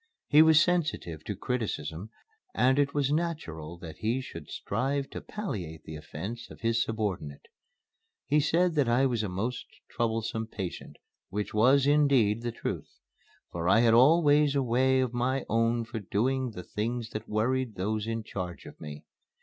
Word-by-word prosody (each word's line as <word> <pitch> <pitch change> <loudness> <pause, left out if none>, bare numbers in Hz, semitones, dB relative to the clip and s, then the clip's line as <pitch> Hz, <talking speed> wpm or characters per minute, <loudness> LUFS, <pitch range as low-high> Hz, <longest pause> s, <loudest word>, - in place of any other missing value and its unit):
He 150 +1 +7
was 160 -1 +7
sensitive 155 - 0
to 105 - -3
criticism 105 -5 -3 0.5
and 130 +2 +3
it 140 -1 +2
was 145 -1 +1
natural 115 - -3
that 85 -2 -9
he 115 +4 0
should 130 - -9
strive 135 +6 -2
to - - -6
palliate 95 - -5
the 80 - -8
offence 95 +10 -7
of - - -13
his 115 +1 +2
subordinate. 100 -10 -3 0.8
He 150 +2 +3
said 170 +4 +2
that 145 -6 +2
I 125 +3 +4
was 120 -4 +1
a 105 - -2
most 110 +7 -3 0.2
troublesome 110 -1 -1
patient, 95 -5 -6 0.3
which 105 +2 -3
was, 130 +6 +5
indeed, 140 -7 +3
the 120 0 -2
truth; 115 - -5 0.6
for 85 +1 -1
I 115 +4 +6
had 115 -1 +5
always 145 +2 +5
a 140 - +2
way 130 +2 +3
of 125 -2 -1
my 125 +2 0
own 115 +1 +1
for 115 0 -5
doing 125 +6 0
the 90 -5 -8
things 115 +5 -3
that 110 +1 -6
worried 120 +2 0
those 105 +3 -2
in 115 -1 -2
charge 90 -5 -6
of - - -12
me. 75 -1 -8
115 Hz, 165 wpm, -29 LUFS, 105-135 Hz, 0.8 s, He